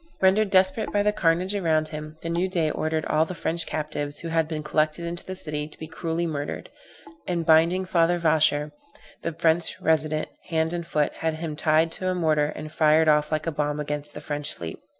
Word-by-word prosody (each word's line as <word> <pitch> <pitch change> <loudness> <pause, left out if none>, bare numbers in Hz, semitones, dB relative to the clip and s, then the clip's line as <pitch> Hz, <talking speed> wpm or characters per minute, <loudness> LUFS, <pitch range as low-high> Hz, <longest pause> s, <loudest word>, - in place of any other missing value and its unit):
Rendered 195 +2 +4
desperate 190 +3 +2
by 205 0 +2
the 210 - +3
carnage 180 0 +1
around 160 -6 +1
him, 155 0 -7
the 165 - -3
new 175 +3 0
Dey 165 -4 0
ordered 155 0 -1
all 155 +1 +2
the 180 +3 -5
French 170 -1 -1
captives 145 -1 -3
who 165 - -6
had 165 -1 +1
been 155 -2 -4
collected 155 +2 0
into 170 +1 -4
the 185 - -6
city 150 -4 -3
to 155 - -12
be 160 - -7
cruelly 165 +1 -3
murdered, 145 -3 -4 0.6
and 170 -2 -1
binding 165 +4 +4
Father 175 -1 +2
Vacher, 155 -2 +2 0.5
the 170 - -3
French 165 +1 +2
Resident, 155 -1 +1 0.2
hand 160 0 0
and 170 -1 -4
foot, 150 -3 0
had 160 -1 -1
him 155 -1 -5
tied 155 +2 +2
to 185 +2 -4
a 185 - +1
mortar 155 -4 +2
and 155 0 -7
fired 155 0 +4
off 150 0 +3
like 155 0 -1
a 165 - -1
bomb 150 0 -1
against 150 0 -4
the - - -7
French 145 0 -3
fleet. 85 -1 -7
160 Hz, 210 wpm, -25 LUFS, 155-170 Hz, 0.6 s, Rendered